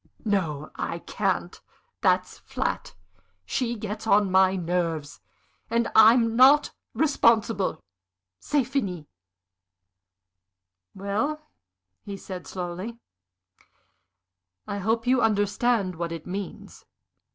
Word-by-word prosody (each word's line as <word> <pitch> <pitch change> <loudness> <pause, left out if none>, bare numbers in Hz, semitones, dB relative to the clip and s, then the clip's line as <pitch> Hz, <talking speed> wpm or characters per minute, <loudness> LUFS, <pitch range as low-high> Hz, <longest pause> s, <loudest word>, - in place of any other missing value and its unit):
"No, 165 -8 -1
I - - -3
can't! - - -2 0.4
That's - - +1
flat. - - -4 0.5
She 240 - -1
gets 215 0 -6
on 205 -2 +4
my 190 0 +4
nerves, 170 -4 -2 0.5
and 230 +1 0
I'm 225 +1 +6
not 270 +4 +6 0.2
responsible. 225 - +2 0.6
C'est 290 -2 +1
fini." 200 - -3 1.9
"Well," 210 +11 -2 0.6
he 200 -1 -7
said, 185 -2 -8
slowly, 185 +5 -5 1.7
"I 205 - -4
hope 225 +4 0
you 255 0 +3
understand 210 -1 +1
what 170 0 -4
it 165 -2 -6
means?" 195 +2 -7
205 Hz, 95 wpm, -26 LUFS, 180-235 Hz, 1.9 s, I'm